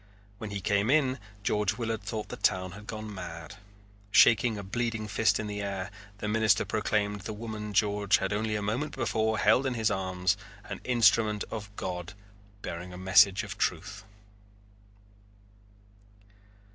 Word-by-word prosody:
When 110 - -5
he 100 -1 -4
came 100 +3 +1
in 135 -3 +3 0.2
George 105 +1 +1
Willard 115 -3 -2
thought 105 +1 -5
the - - -5
town 95 0 +1
had 105 +3 -11
gone 110 -1 -6
mad. 85 -2 -8 0.5
Shaking 115 +2 +5
a 100 - -5
bleeding 115 +2 -2
fist 105 +2 +2
in 110 - -3
the 105 0 -4
air, 100 -1 -4 0.3
the 105 - -4
minister 110 -1 +3
proclaimed 105 -1 -1
the 110 - -5
woman 105 -1 -6
George 105 0 +3
had 95 +1 -2
only 110 +1 -1
a 105 - -2
moment 125 +9 -2
before 110 -3 0
held 130 +5 +4
in 130 - -2
his 110 -1 +1
arms 95 0 0 0.3
an - - -7
instrument 110 -3 +3
of 105 -2 -5
God 90 0 -5 0.5
bearing 90 +2 -6
a 90 - -8
message 95 +1 +5
of - - -7
truth. 95 +4 -2
105 Hz, 155 wpm, -29 LUFS, 95-110 Hz, 0.5 s, Shaking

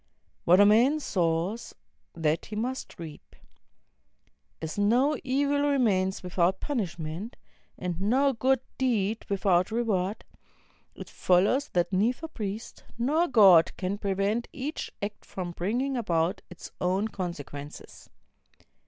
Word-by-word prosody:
What 180 +3 +6
a 205 - +8
man 240 +9 +4
sows, 180 - -1 0.4
that 160 -1 0
he 210 - -7
must 250 +5 -4
reap. 160 -3 -10 1.2
As 160 -1 -5
no 245 +9 +3
e\al 285 +2 +1
remains 200 -10 +1
without 180 +1 +1
punishment, 190 - -4 0.4
and 180 -1 -4
no 265 +7 +3
good 260 +2 +1 0.2
deed 225 -4 0
without 190 -2 +2
reward, 215 -3 -1 0.7
it - - -9
follows 200 +10 +2
that 175 +2 +1
neither 240 - +1
priest 215 -6 -6
nor 300 +9 +2
God 195 - +6
can 195 +2 -3
prevent 200 +4 -1
each 290 +3 -5
act 205 +1 -5
from 180 -2 -6
bringing 240 +11 -1
about 180 -5 0
its 180 - -11
own 190 +4 +1
consequences. 150 -7 -7
205 Hz, 120 wpm, -27 LUFS, 180-245 Hz, 1.2 s, a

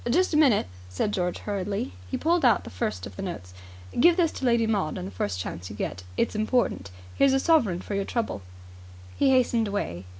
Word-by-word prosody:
"Just 360 +8 +2
a - - +4
minute," 275 -9 +4 0.2
said 90 - -1
George 180 -3 -1
hurriedly. 200 - -3 0.2
He - - -2
pulled 340 +1 +1
out 245 - +4
the - - -9
first 90 0 -3
of 100 -2 -10
the - - -5
notes. 90 0 -6 0.5
"Give 340 +6 +6
this 335 -3 +3
to 265 - -5
Lady 235 -2 +3
Maud 200 -8 0
the 95 +2 -5
first 90 0 -3
chance 90 0 -5
you 100 - -8
get. 95 -3 -4 0.2
It's - - +1
important. 215 - 0 0.2
Here's 275 -1 +4
a 270 - +3
sovereign 235 - +3
for 205 - -6
your 200 0 -1
trouble." 225 - -2 0.7
He 275 - +3
hastened 245 -4 +3
away. 95 - -3
205 Hz, 205 wpm, -26 LUFS, -, 0.7 s, Give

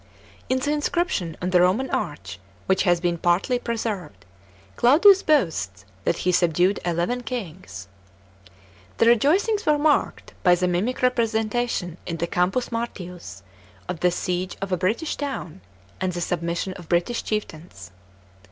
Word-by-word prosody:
In 260 - +2
the 285 +3 -1
inscription 295 - -1
on 180 - -1
the 180 -1 +5
Roman 195 +9 +2
arch, 95 - -4 0.3
which 190 - +2
has 175 -2 +3
been 175 -1 -1
partly 180 +9 +1
pre 235 -1 -3
served, 185 - -5 0.5
Claudius 360 +11 +6
boasts 160 - 0 0.2
that - - +1
he 180 - +4
subdued 175 +2 +2
eleven 175 +8 -1
kings 185 - -7 0.6
f - - -25 0.5
The - - +4
rejoicings 335 - +3
were 300 -1 +3
marked 295 0 0
by 180 -1 +5
the 180 +1 0
mimic 195 +9 -1
representation 225 -6 0
in 170 - -3
the 170 - -1
Campus 180 +9 0
Martius 180 - -6 0.4
of 170 - -4
the 180 - +3
siege 180 +1 -3
of 195 0 -5
a - - +3
British 215 - -1
town 265 - -5 0.4
and 185 -1 0
the 175 - -4
submission 170 +2 -2
of 170 -3 -13
Biitish 175 +8 0
chieftains. 160 - -5
185 Hz, 150 wpm, -24 LUFS, 175-245 Hz, 0.6 s, Claudius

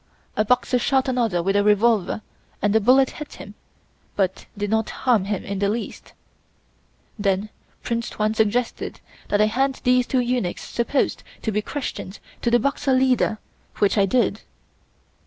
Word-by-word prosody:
A 215 - +2
Boxer 250 +2 +2
shot 265 +2 +1
another 230 -9 +1
with 195 +2 +1
a 205 - +4
revolver 210 -1 +2 0.4
and 205 0 +1
the 220 - +5
bullet 260 +4 +5
hit 300 -1 -8
him, - - -10 0.6
but 190 -1 -1
did 205 0 -2
not 220 0 +1
harm 235 -7 +1
him 200 -1 -2
in 200 -1 -4
the 200 0 +1
least. 225 +2 -5 1.1
Then 200 +1 0 0.3
Prince 235 0 -2
Tuan 215 0 -1
suggested 220 +2 -1 0.3
that 205 - +1
I - - +6
hand 265 +5 0
these 250 -1 +3
two 255 - +2
eunuchs 240 -7 -1
supposed 240 +4 -1 0.2
to 220 - 0
be 210 +1 0
Christians 210 -6 -5 0.2
to 235 - +1
the 240 - +5
Boxer 275 +2 0
leader, 255 -4 +2 0.4
which 205 - +2
I 200 -2 +3
did. 215 -2 +1
220 Hz, 160 wpm, -23 LUFS, 205-250 Hz, 1.1 s, I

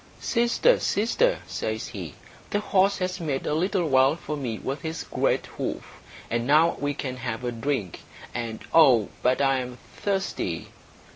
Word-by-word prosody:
"Sister, 240 - +3
sister," 445 - +1
says - - -3
he, - - -7 0.3
"the 205 - +1
horse 200 -1 +2
has 185 0 -2
made 145 -5 -2
a - - 0
little 180 +2 +1
well 135 +1 +4
for 155 -2 -5
me 125 -6 -3
with 135 +5 -4
his 160 -1 -4
great - - 0
hoof, - - -6 0.3
and 120 +1 -1
now 155 +4 +5
we 145 0 -1
can 130 -2 -4
have 120 -1 -4
a 120 - -1
drink; 115 - -2 0.3
and 115 -2 -4
oh, 130 -10 +6
but 125 +2 +2
I 135 -1 +3
am 125 -1 -6 0.2
thirsty!" 195 -1 -2
145 Hz, 160 wpm, -26 LUFS, 125-185 Hz, 0.3 s, oh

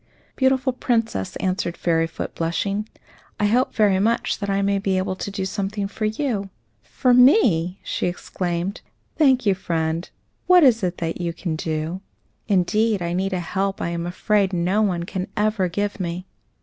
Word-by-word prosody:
"Beautiful 260 0 +2
Princess," 225 - -1
answered 185 -2 -2
Fairyfoot, 165 -1 -1
blushing, 200 +6 -2 0.5
"I 210 - +2
hope 245 +5 +2
very 205 -3 +3
much 230 +4 +1
that 200 -1 -3
I 195 0 +1
may 200 0 +1
be 195 -1 0
able 185 0 -1
to - - -4
do 195 -1 -3
something 200 +1 -2
for 215 +2 -4
you." 215 -3 -1 0.3
"For 250 - +1
me!" 230 - +5
she - - -2
exclaimed. 175 +2 -3 0.4
"Thank 265 -5 +4
you, 200 - +4
friend; 165 -2 -2 0.4
what 360 -2 +7
is 240 -5 +5
it 175 -2 -2
you 170 -1 -2
can 165 -1 -3
do? 160 +3 -3 0.5
Indeed, 210 +1 +2
I 170 0 -2
need 190 +2 -1
a 185 - 0
help 195 +3 -2
I - - -2
am 170 0 -3
afraid 195 +2 +1
no 180 +4 +1
one 180 -5 0
can 185 +1 -4
ever 210 -3 +1
give 205 +3 -2
me." 180 0 -3
195 Hz, 165 wpm, -22 LUFS, 175-215 Hz, 0.5 s, what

